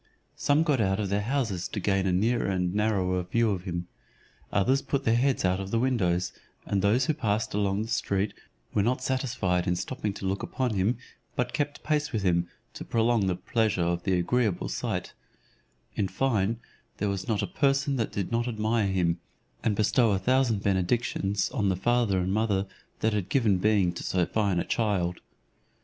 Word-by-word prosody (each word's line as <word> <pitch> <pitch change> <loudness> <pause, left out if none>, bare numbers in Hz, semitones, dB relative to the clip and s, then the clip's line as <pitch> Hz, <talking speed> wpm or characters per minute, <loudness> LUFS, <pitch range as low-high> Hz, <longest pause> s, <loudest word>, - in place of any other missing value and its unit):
Some 145 +3 +2
got 145 -7 +2
out 95 0 +1
of 100 -2 -1
their 100 +1 +1
houses 110 -6 -1
to - - -4
gain 95 0 +1
a - - +2
nearer 115 +7 +1
and 90 -2 0
narrower 100 -4 +1
view 110 +5 +1
of 95 -2 -3
him; 85 -1 -3 0.6
others 130 +8 +2
put 140 -1 -2
their 115 - +3
heads 130 -3 +2
out 90 +1 +2
of 95 0 -5
the 115 - 0
windows, 95 -8 +1 0.3
and 100 - 0
those 110 +7 +3
who 155 - +1
passed 110 -7 -1
along 100 0 +1
the - - -6
street 100 -3 0 0.4
were 105 - +3
not 125 +4 0
satisfied 120 -10 0
in 90 - +2
stopping 105 +2 -3
to 95 - -6
look 95 +1 -1
upon 125 -3 -1
him, 105 +5 +1 0.4
but 125 - -1
kept 145 -1 -2
pace 150 -1 0
with 110 -4 -1
him, 85 -2 +2 0.3
to - - -7
prolong 115 -3 +2
the 90 - +1
pleasure 100 0 0
of 85 0 0
the 95 - 0
agreeable 105 +1 0
sight: - - -3 0.8
in 100 - 0
fine, 110 0 0 0.4
there 105 - -1
was 100 +1 -3
not 110 -3 0
a - - +1
person 140 -5 +1
that 115 - -1
did 100 0 -3
not 120 +1 0
admire 110 -2 0
him, 90 -3 +1 0.4
and 110 -3 +1
bestow 110 +2 +3
a - - +2
thousand 120 0 +2
benedictions 100 +1 0
on 105 -7 +1
the 95 - +1
father 115 0 +2
and 95 +1 0
mother 105 -2 +1 0.4
that 110 0 +2
had 100 -3 -2
given 110 -8 +3
being 100 -3 +3
to 90 - -6
so 90 -2 +1
fine 100 -4 0
a - - 0
child. 95 -6 0
105 Hz, 195 wpm, -27 LUFS, 95-120 Hz, 0.8 s, their